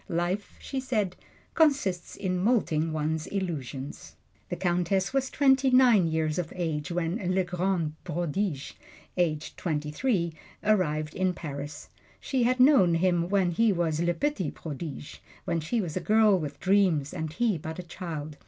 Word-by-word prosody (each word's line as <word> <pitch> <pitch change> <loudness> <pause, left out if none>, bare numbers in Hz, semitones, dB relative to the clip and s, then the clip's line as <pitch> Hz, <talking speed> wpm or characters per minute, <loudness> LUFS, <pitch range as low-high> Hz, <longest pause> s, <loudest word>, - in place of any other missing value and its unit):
"Life," 175 +4 -2
she 270 - -4
said, 215 -8 -1 0.4
"consists 275 - +1
in 185 -2 -2
molting 180 -7 +1
one's 155 +1 -2
illusions." 150 -8 -5 0.3
The - - -2
Countess 180 +3 0
was 270 -1 +1
twenty 270 -2 +4
nine 245 -8 +5
years 160 0 0
of 170 -3 -3
age 160 -5 -2
when 170 +2 -1 0.2
"Le 190 - +3
Grand 180 -3 -1
Prodige," 170 -2 -2 0.4
aged 155 -4 -1
twenty 150 -3 -2
three, 170 - 0 0.3
arrived 155 -8 +1
in 185 -1 0
Paris. 145 -2 -6 0.3
She 265 -2 -1
had 250 +2 +2
known 250 - +6
him 175 0 +1
when 190 -3 +2
he 225 +5 +3
was 165 -4 0
"Le 175 0 +1
Petit 285 - -1
Prodige" 150 -1 -7 0.3
when 170 -2 0
she 170 +10 -1
was 175 -7 -3
a - - +1
girl 215 -1 +4
with 145 -3 -5
dreams 185 -7 +2
and 160 -3 -4
he 220 -3 +1
but 160 +2 -6
a 180 - -5
child. 160 -4 -6
175 Hz, 155 wpm, -28 LUFS, 160-205 Hz, 0.4 s, known